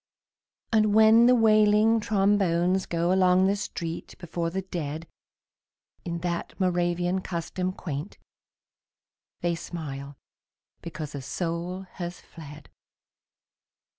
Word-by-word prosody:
And 215 -2 +3
when 220 +2 +7
the 250 - +6
wailing 215 0 +4
trombones 195 -3 +1
go 170 +1 +1
Along 185 0 +4
the 195 +1 +2
street 170 -4 -5
before 170 -1 -3
the 190 +3 -3
dead 160 -3 -5 1.0
In 170 -1 -4
that 170 +2 -4
Moravian 175 0 0
custom 180 +1 -3
quaint, 160 -2 -6 1.2
They 175 0 +1
smile 145 -5 -7 0.6
because 155 -3 -7
a 140 - -5
soul 170 +5 -3
has 175 -2 -7
fled. 150 -2 -13
175 Hz, 105 wpm, -26 LUFS, 170-195 Hz, 1.2 s, when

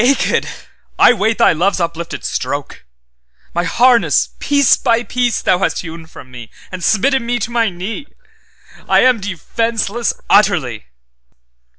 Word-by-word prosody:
'Naked 270 +3 +1 0.5
I - - +6
wait 220 0 0
Thy - - +4
love's 185 +5 0
uplifted 170 -1 -4
stroke! 140 - -4 0.7
My 175 +1 -1
harness 240 +4 +3
piece 285 -3 +3
by 235 -2 0
piece 240 0 -1
Thou 180 - +2
hast 195 - -1
hewn 165 -1 -9
from 130 -5 -14
me, 120 -2 -10 0.2
And 185 -1 -7
smitten 265 +7 +2
me 240 +1 -1
to 235 +1 -4
my 230 -2 +1
knee;I 195 - -5
am 255 -3 +3
defenceless 225 +4 -2
utterly. 155 - +2
205 Hz, 130 wpm, -16 LUFS, 170-240 Hz, 0.7 s, I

